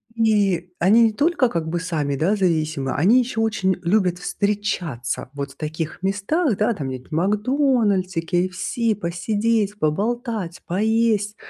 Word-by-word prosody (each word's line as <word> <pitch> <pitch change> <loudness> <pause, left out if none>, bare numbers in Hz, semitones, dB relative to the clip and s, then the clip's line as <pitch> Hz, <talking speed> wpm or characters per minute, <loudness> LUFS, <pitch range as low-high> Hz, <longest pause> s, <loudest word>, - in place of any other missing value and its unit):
Ни, 205 -6 +2
они 210 +7 +5
не 220 -1 +3
только 285 -2 +2
как 165 -4 -3
бы 175 +2 -1
сами, 155 -5 -2
да, 170 +9 +1
зависимы, 155 -7 0
они 200 - +4
еще 240 -2 -2
очень 215 -4 +1
любят 180 -1 +1
встречаться 195 - -2
вот 140 -1 -5
в - - -31
таких 155 +3 -5
местах, 205 - 0
да, 225 +3 +2
там 140 -7 -4
где-нибудь 130 +1 -8
в - - -3
"Макдональдсе", 210 - +1
"КейЭфСи", 185 +7 -1
посидеть, 205 +3 -1
поболтать, 210 - -2
поесть. 215 +2 +1
195 Hz, 140 wpm, -22 LUFS, 170-220 Hz, -, они